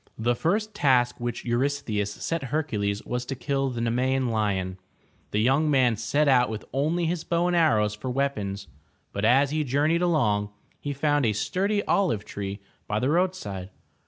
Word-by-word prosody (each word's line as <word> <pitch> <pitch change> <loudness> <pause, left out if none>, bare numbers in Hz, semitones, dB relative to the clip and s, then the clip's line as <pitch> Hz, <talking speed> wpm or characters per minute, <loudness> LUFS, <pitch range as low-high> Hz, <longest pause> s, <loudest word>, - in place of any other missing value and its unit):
The 120 +2 +1
first 210 - 0
task 130 -10 +2
which 120 -1 -4
Eurystheus 120 -5 0
set 165 +6 -3
Hercules 110 -8 -2
was 125 0 -2
to 135 - -3
kill 135 +1 -1
the 120 -2 -4
Nemean 125 +2 +1
lion. 95 -4 -1 0.5
The 105 - 0
young 140 +5 +3
man 130 -5 +3
set 140 +8 +1
out 125 -3 +4
with 110 -1 -5
only 155 +6 +1
his 170 0 -1
bow 170 0 0
and 180 0 +1
arrows 110 -11 +3
for 105 +5 -6
weapons, 105 -8 -2 0.5
but 100 - -3
as 135 +4 +4
he 155 0 0
journeyed 150 +5 +1
along, 110 -13 +2 0.3
he 145 - -4
found 145 +1 +1
a 105 - +2
sturdy 200 - 0
olive 155 - +1
tree 100 0 -5 0.3
by 105 - -1
the 125 +5 +1
roadside. 150 - -1
130 Hz, 170 wpm, -26 LUFS, 105-155 Hz, 0.5 s, out